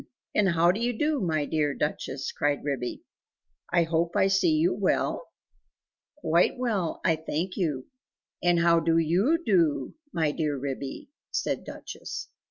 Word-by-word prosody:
and 205 -2 +3
how 170 +1 +5
do 200 - -3
you 240 -1 -1
do, 295 -1 +1
my 155 -4 0
dear 150 -2 0
Duchess?" 140 -2 -3
cried 145 -1 0
Ribby. 135 -4 -3 0.7
"I 175 -1 +4
hope 165 +2 0
I 195 -1 +4
see 195 - +3
you 330 +4 +3
well?" - - 0 0.9
"Quite 175 - +2
well, 215 -9 -1
I 165 - +4
thank 160 +3 -3
you, 150 -9 -1 0.6
and 175 -1 +3
how 170 0 +5
do 165 0 +2
YOU 180 - +3
do, 165 -9 +2 0.2
my 160 - +1
dear 150 -2 -1
Ribby?" 135 - -5 0.2
said - - -2
Duchess. - - -7
170 Hz, 150 wpm, -27 LUFS, 150-195 Hz, 0.9 s, how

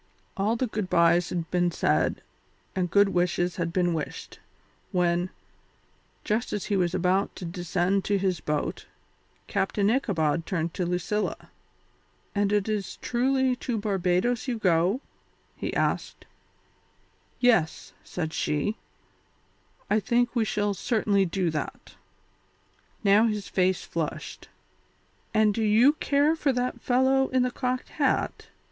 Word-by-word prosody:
All 210 +3 +1
the 255 - 0
good 215 -5 -3
byes 170 0 +4
had 170 -2 -4
been 175 -1 +2
said 170 - 0 0.5
and 180 -2 0
good 200 +2 +4
wishes 175 -1 0
had 170 -1 -1
been 175 -1 +1
wished, 155 -2 -5 0.5
when, 175 0 +1 0.9
just 220 +3 -1
as 205 - -2
he 205 - 0
was 180 -2 +1
about 190 +3 +1
to 185 - -7
descend 180 +2 0
to 205 - +2
his 185 -3 0
boat, 150 -1 -3 0.6
Captain 200 +1 +1
Ichabod 165 - 0
turned 165 -3 -2
to 180 - -2
Lucilla. 180 +4 -2 0.8
"And 205 -1 +1
it 205 -1 +1
is 205 -3 -3
truly 260 +1 +1
to 240 -1 -3
Barbadoes 200 +4 0
you 245 -2 -1
go?" 185 +4 +2 0.5
he - - -4
asked. - - -1 1.1
"Yes," 225 -11 +2
said 160 -3 -4
she, 150 +8 -1 1.1
"I 210 - +2
think 240 +3 +1
we 230 -2 +2
shall 205 -1 0
certainly 205 -2 +1
do 175 -1 0
that." 155 - -5 1.1
Now 210 +3 +5
his 210 -2 -3
face 185 0 +1
flushed. - - -5 0.8
"And 215 -1 +3
do 225 - -2
you 220 +7 +5
care 295 +1 +2
for 295 -3 +1
that 250 0 -2
fellow 265 +1 +3
in 260 -1 +2
the 250 - 0
cocked 255 0 -2
hat?" - - -1
200 Hz, 135 wpm, -26 LUFS, 175-230 Hz, 1.1 s, Now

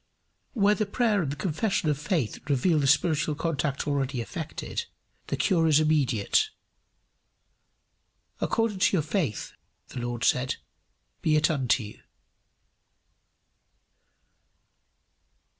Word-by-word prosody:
Where 210 -4 +4
the 210 -1 -1
prayer 215 -2 +1
and 145 -5 -2
the - - -4
confession 190 +4 -1
of 150 - +2
faith 150 - -1
reveal 150 +4 +2
the 140 - +1
spiritual 150 +1 +2
contact 145 -3 -2
already 140 -2 -1
effected, 165 - -5 0.4
the - - -2
cure 170 -5 +2
is 155 -1 +5
immediate. 150 - +2 1.9
"According 225 -4 0
to 190 - +3
your 160 - +1
faith," 155 - -2 0.4
the - - -6
Lord 120 0 -3
said, 130 +1 +2 0.7
"be 155 - +2
it 150 +2 +3
unto 130 -5 +1
you." 105 - -10
155 Hz, 110 wpm, -27 LUFS, 135-185 Hz, 1.9 s, is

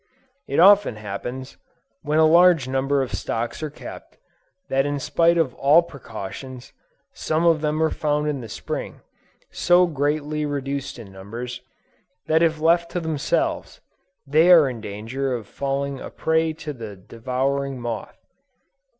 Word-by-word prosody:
It 140 - 0
often 200 - +6
happens, 110 +6 -7 0.4
when 150 +1 -1
a 160 - +6
large 170 -3 +5
number 135 +1 +1
of 130 - -7
stocks 115 +5 -3
are 155 - -3
kept, 145 - -11 0.5
that 135 0 +1
in 145 0 -2
spite 165 +5 +2
of 155 -7 +1
all 150 +7 +4
precautions, 130 - -9 0.4
some 160 +2 -1
of 165 -2 +4
them 155 +1 0
are 160 - +2
found 150 0 -1
in 145 -3 -2
the 115 - -9
Spring, - - -6 0.5
so 175 +1 +4
greatly 150 -1 -1
reduced 140 -2 -3
in 110 -5 -11
numbers, 115 +6 -7 0.6
that 160 +1 +2
if 160 -2 +2
left 170 +2 +3
to 175 - 0
themselves, 160 -4 -2 0.5
they 155 +5 +4
are 165 -5 +8
in 120 -4 -5
danger 115 +6 -3
of 115 -3 -6
falling 140 +2 -3
a - - -7
prey 160 0 0
to 155 -1 -7
the 110 -5 -8
devouring 130 +7 -3
moth. 120 -1 -5
140 Hz, 150 wpm, -23 LUFS, 125-160 Hz, 0.6 s, are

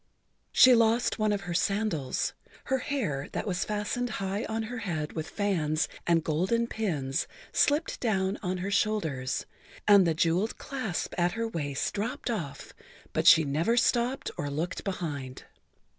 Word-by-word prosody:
She 255 - +8
lost 230 0 +3
one 215 0 +2
of 205 -1 0
her 175 -2 -5
sandals, 195 -7 0 0.3
her 265 -1 0
hair, 210 - -2
that - - -2
was 185 -3 -1
fastened 215 +4 -2
high 200 0 -2
on 220 0 -2
her 245 +2 -5
head 160 -8 -3
with 160 -1 -4
fans 160 -7 0 0.2
and 165 -2 +3
golden 185 +10 +1
pins, 155 - -2 0.3
slipped 295 +3 +2
down 195 -4 0
on 185 -1 -2
her 200 - -2
shoulders, 160 -12 0 0.4
and 200 -3 +7
the 165 - +1
jeweled 175 +7 +1
clasp 255 -10 -3
at 175 0 +2
her 230 +1 -2
waist 145 -9 -2
dropped 225 +3 -2
off, 150 -11 -5 0.4
but - - +1
she 160 - +9
never 160 +11 +1
stopped 245 +2 +1
or 145 - -2
looked 160 +5 -3
behind. 145 -9 -4
195 Hz, 155 wpm, -29 LUFS, 160-225 Hz, 0.4 s, she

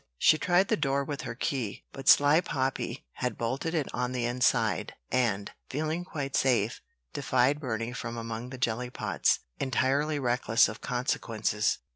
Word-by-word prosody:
She 155 - +5
tried 180 +5 +3
the - - +4
door 140 -2 +1
with 140 0 -4
her - - -5
key; 125 -4 -3
but 135 0 -1
sly 145 +3 +7
Poppy 135 - -2
had 125 -3 -2
bolted 135 +8 -2
it 150 -4 0
on 125 +1 -1
the 125 -2 -1
inside, 120 -3 +1 0.2
and, 115 -6 +1 0.2
feeling 155 +5 -2
quite 140 -6 -4
safe, 120 -4 +2 0.3
defied 130 +3 +2
Burney 115 -4 -3
from 115 -2 -5
among 115 +1 -5
the 130 - -7
jelly 120 0 -1
pots, - - +1 0.2
entirely 140 +4 +1
reckless 120 -3 +3
of 110 - -8
consequences. 115 -4 0
125 Hz, 155 wpm, -29 LUFS, 115-140 Hz, 0.3 s, sly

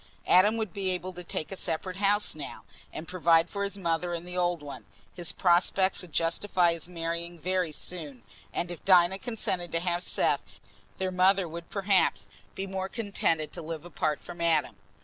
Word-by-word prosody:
Adam 205 +5 +5
would 220 -5 -3
be 195 -2 -1
able 185 0 -1
to 180 0 -7
take 165 -1 -3
a - - -3
separate 185 +1 -3
house 205 +1 +3
now, 150 -2 -7 0.3
and 160 - -7
provide 170 -1 +3
for 200 0 -2
his 200 0 -3
mother 175 -1 -1
in 170 +1 -6
the 180 0 -5
old 175 -3 +1
one; 145 -1 -8 0.3
his 175 -2 -3
prospects 185 +1 +3
would 180 -3 -12
justify 170 +2 +2
his 165 +1 -7
marrying 170 0 -4
very 180 0 0
soon, 150 -6 -4 0.3
and 175 +1 -2
if 175 - -8
Dinah 185 0 +5
consented 185 -7 -2
to 165 - +3
have 175 0 0
Seth, - - +1 0.6
their 190 -1 -1
mother 185 0 +3
would 170 +1 -8
perhaps 195 -2 +2 0.3
be 195 - -3
more 190 0 -3
contented 180 -8 0
to - - -5
live 160 0 -6
apart 155 -3 -2
from 175 -1 -9
Adam. 160 -4 +2
175 Hz, 185 wpm, -29 LUFS, 165-190 Hz, 0.6 s, Adam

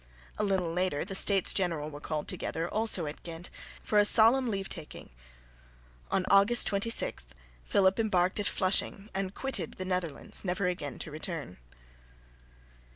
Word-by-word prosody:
A - - +1
little 190 -5 0
later 180 -4 -1
the 195 - -6
States 195 -1 +5
General 165 -5 -1
were 145 0 -10
called 150 -1 -4
together, 165 +2 -4
also 215 -4 0
at 150 +1 -7
Ghent, 170 +1 -8 0.3
for 210 - +2
a - - +6
solemn 230 +5 +6
leave 195 -2 -2
taking. 160 - -7 1.0
On 190 - 0
August 200 +5 +5
26, 200 - -1 0.4
Philip 190 +1 +2
embarked 185 -3 +1
at 205 - +1
Flushing, 195 +2 0
and 190 0 -3
quitted 270 0 -2
the 185 - -5
Netherlands, 180 -6 -1
never 185 +1 -1
again 150 -7 -3
to 155 - -5
return. 155 - -5
185 Hz, 150 wpm, -29 LUFS, 165-205 Hz, 1.0 s, a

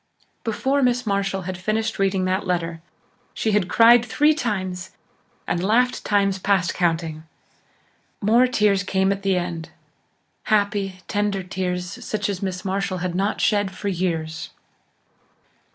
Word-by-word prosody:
Before 265 +5 0
Miss 250 -1 +2
Marshall 195 -2 -1
had 185 0 -5
finished 215 +3 -1
reading 195 -1 +1
that 185 +1 -1
letter 170 -2 -2 0.5
she 220 - 0
had 205 -3 +2
cried 235 +2 +6
three 295 +5 +3
times 185 - -3 0.5
and 175 - -1
laughed 240 +5 +2
times 200 -2 +1
past 190 -3 +1
counting. 165 -3 -1 1.0
More 230 +5 +4
tears 210 -5 +2
came 190 +1 +1
at 200 0 -2
the 195 -2 +1
end 175 -2 -4 0.8
happy, 200 -3 0
tender 205 -2 -1
tears 180 +3 -4
such 205 -2 -2
as 195 -2 -3
Miss 190 -1 -4
Marshall 190 0 -1
had 180 - -2
not 195 +3 -1
shed 205 -2 +2
for 205 - -3
years. 165 -3 -2
195 Hz, 135 wpm, -23 LUFS, 180-210 Hz, 1.0 s, cried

